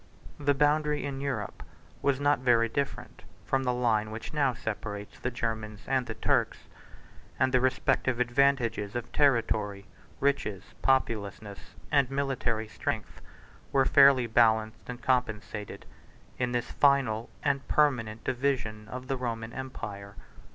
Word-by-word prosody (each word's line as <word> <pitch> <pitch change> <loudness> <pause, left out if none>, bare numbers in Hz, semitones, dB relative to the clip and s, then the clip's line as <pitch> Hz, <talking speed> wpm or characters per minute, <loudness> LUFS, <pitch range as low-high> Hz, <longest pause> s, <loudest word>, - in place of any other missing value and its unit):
The 145 -1 +2
boundary 150 +1 +2
in 135 -1 -4
Europe 130 -8 -3 0.4
was 140 -1 +1
not 145 -2 +3
very 120 -2 +3
different 140 +5 -4 0.2
from 135 - +1
the 125 -1 0
line 115 -3 +1
which 110 +6 -7
now 140 -3 +2
separates 105 -2 -5
the 125 - -2
Germans 110 -3 -4
and 130 -2 0
the 110 - -5
Turks; - - +1 0.8
and 130 0 +2
the 130 - +4
respective 130 -1 +1
advantages 120 -4 +1
of 120 -1 -4
territory, 115 -7 +1 0.3
riches, 105 -9 0 0.2
populousness, 105 -6 -1 0.2
and 140 -3 +3
military 135 -5 -1
strength, 95 -5 -4 0.5
were 135 -1 +3
fairly 135 -3 +6
balanced 110 -1 +2
and 125 0 -7
compensated, 110 -4 -2 0.5
in 125 -1 0
this 120 -1 -2
final 130 -6 +2
and 140 -1 0
permanent 120 -7 +1
division 120 -5 -1
of 125 +3 -7
the 135 - -1
Roman 115 -2 -4
empire. 105 -6 -7
125 Hz, 130 wpm, -29 LUFS, 110-135 Hz, 0.8 s, fairly